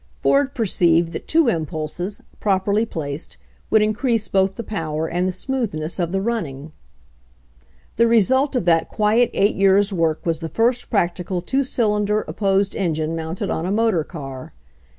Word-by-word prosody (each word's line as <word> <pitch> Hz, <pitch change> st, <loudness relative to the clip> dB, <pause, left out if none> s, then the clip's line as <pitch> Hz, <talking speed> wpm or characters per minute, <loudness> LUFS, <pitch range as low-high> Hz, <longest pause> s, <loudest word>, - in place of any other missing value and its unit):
Ford 275 Hz, -1 st, +2 dB
perceived 170 Hz, -7 st, +2 dB
that -, -, -6 dB
two 320 Hz, -3 st, +3 dB
impulses, 165 Hz, +1 st, -3 dB, 0.2 s
properly 205 Hz, +2 st, +1 dB
placed, 150 Hz, -4 st, -6 dB, 0.3 s
would 220 Hz, -1 st, +4 dB
increase 220 Hz, +1 st, 0 dB
both 190 Hz, 0 st, +1 dB
the 230 Hz, -, -5 dB
power 160 Hz, -7 st, -3 dB
and 175 Hz, +3 st, -1 dB
the -, -, 0 dB
smoothness 185 Hz, -7 st, -3 dB
of 170 Hz, -1 st, -1 dB
the 195 Hz, 0 st, 0 dB
running. 160 Hz, -, -3 dB, 1.3 s
The 235 Hz, -, +4 dB
result 260 Hz, +5 st, +3 dB
of 245 Hz, -, 0 dB
that 165 Hz, -2 st, +3 dB
quiet 220 Hz, +3 st, +2 dB
eight 200 Hz, +2 st, +2 dB
years' 195 Hz, +1 st, +3 dB
work 165 Hz, -3 st, 0 dB
was 165 Hz, -2 st, 0 dB
the 165 Hz, -1 st, -5 dB
first 240 Hz, +5 st, 0 dB
practical 180 Hz, -3 st, -1 dB
two 265 Hz, +10 st, 0 dB
cylinder 210 Hz, -4 st, +1 dB
opposed 195 Hz, -1 st, 0 dB
engine 160 Hz, -4 st, -1 dB
mounted 165 Hz, +2 st, -4 dB
on 165 Hz, -, -2 dB
a -, -, -1 dB
motor 215 Hz, -6 st, +2 dB
car. 135 Hz, -6 st, -8 dB
195 Hz, 155 wpm, -21 LUFS, 165-220 Hz, 1.3 s, would